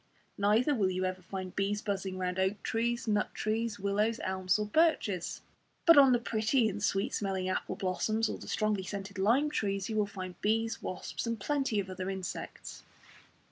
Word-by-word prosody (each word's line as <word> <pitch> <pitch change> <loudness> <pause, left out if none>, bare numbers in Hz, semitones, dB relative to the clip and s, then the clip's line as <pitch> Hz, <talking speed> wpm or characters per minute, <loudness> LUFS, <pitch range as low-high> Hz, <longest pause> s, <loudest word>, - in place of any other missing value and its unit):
Neither 215 +8 +3
will 205 -8 +2
you 185 0 -1
ever 185 0 -3
find 185 0 -6
bees 200 +1 0
buzzing 195 -3 -3
round 185 0 -2
oak 190 +2 0
trees, 235 +1 -1
nut 210 -1 0
trees, 220 0 -1
willows, 210 +3 +1
elms 185 0 +1
or 210 - -1
birches. 210 - +1 0.4
But 335 - +9
on 275 -2 +8
the 245 - +5
pretty 230 +1 +1
and 210 0 -3
sweet 195 -1 0
smelling 190 -2 -1
apple 185 - -2
blossoms, 215 +4 0
or - - -4
the - - -10
strongly 215 -2 0
scented 195 0 -6
lime 250 +10 +3
trees, 195 -5 -1
you 220 - -2
will 210 -1 +2
find 185 -3 -7
bees, 225 +1 0
wasps, 185 +5 -4
and 230 -1 -2
plenty 270 -2 0
of 195 - -2
other 185 0 -4
insects. 190 -2 -6
205 Hz, 180 wpm, -31 LUFS, 190-225 Hz, 0.4 s, But